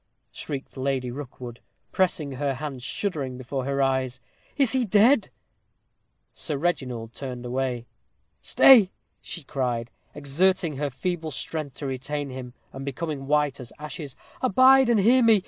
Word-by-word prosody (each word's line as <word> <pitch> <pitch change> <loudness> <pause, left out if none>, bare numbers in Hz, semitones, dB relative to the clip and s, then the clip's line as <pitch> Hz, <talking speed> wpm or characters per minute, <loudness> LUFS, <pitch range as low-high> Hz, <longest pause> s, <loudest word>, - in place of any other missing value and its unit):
shrieked 140 -2 -6
Lady 130 -2 -1
Rookwood, 125 -3 -8 0.3
pressing 170 -6 +1
her 135 +1 -1
hand 135 -2 -6
shuddering 140 -4 -3
before 130 +1 -4
her 140 0 +1
eyes. 130 -1 0 0.4
"Is 270 -5 +3
he 260 0 +2
dead?" 220 +4 +4 1.0
Sir 150 -3 -3
Reginald 125 -8 -2
turned 125 -2 -6
away. 125 -1 -2 0.6
"Stay," 230 -8 +7 0.3
she 170 - -7
cried, 125 -4 -2 0.2
exerting 155 +2 +1
her 145 0 -1
feeble 165 +4 -3
strength 150 -1 -5
to 145 - -7
retain 140 +2 -3
him, 125 -1 -8 0.2
and 135 - -7
becoming 140 0 -4
white 150 -2 +1
as 125 -2 -9
ashes, 150 -2 -7 0.3
"abide 260 +2 +6
and 230 -3 +4
hear 240 +6 +5
me. 225 -3 +6
140 Hz, 140 wpm, -25 LUFS, 130-175 Hz, 1.0 s, Stay